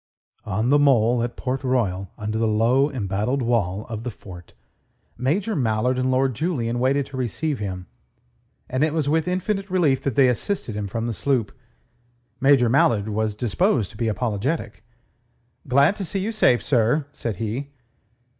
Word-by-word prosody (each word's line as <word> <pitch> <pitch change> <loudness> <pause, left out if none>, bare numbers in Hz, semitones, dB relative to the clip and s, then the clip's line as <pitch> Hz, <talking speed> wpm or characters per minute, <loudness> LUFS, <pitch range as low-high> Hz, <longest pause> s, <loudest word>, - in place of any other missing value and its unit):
On 110 +5 0
the 145 - +5
mole 120 -4 +4
at 120 0 -3
Port 130 +2 -3
Royal, 100 -8 0
under 110 +1 -3
the 115 - +2
low, 120 +6 +3
embattled 115 +2 -1
wall 110 -4 0
of 110 -2 -5
the 125 - -3
fort, 90 -5 -12 0.6
Major 185 - -1
Mallard 125 -1 +1
and 130 0 +1
Lord 130 0 +2
Julian 120 -5 -2
waited 135 +2 +1
to 135 - -9
receive 130 +4 -2
him, 95 -3 -5 0.8
and 130 +3 0
it 155 0 0
was 155 -3 0
with 160 +3 +1
infinite 195 +2 -2
relief 165 -8 +2
that 135 -5 -2
they 135 -2 +5
assisted 125 - -2
him 105 -1 -3
from 115 +4 -3
the 120 - -2
sloop. 120 +1 0 0.9
Major 135 -2 +4
Mallard 115 -4 +2
was 110 0 -1
disposed 120 - 0
to - - -17
be 115 - -1
apologetic. 110 +2 -2 0.8
"Glad 140 +8 +4
to 200 - -4
see 190 +2 -3
you 205 +4 -2
safe, 125 - +3
sir," 125 +3 +2
said 115 -6 -4
he. 115 +7 -3
125 Hz, 165 wpm, -23 LUFS, 110-140 Hz, 0.9 s, the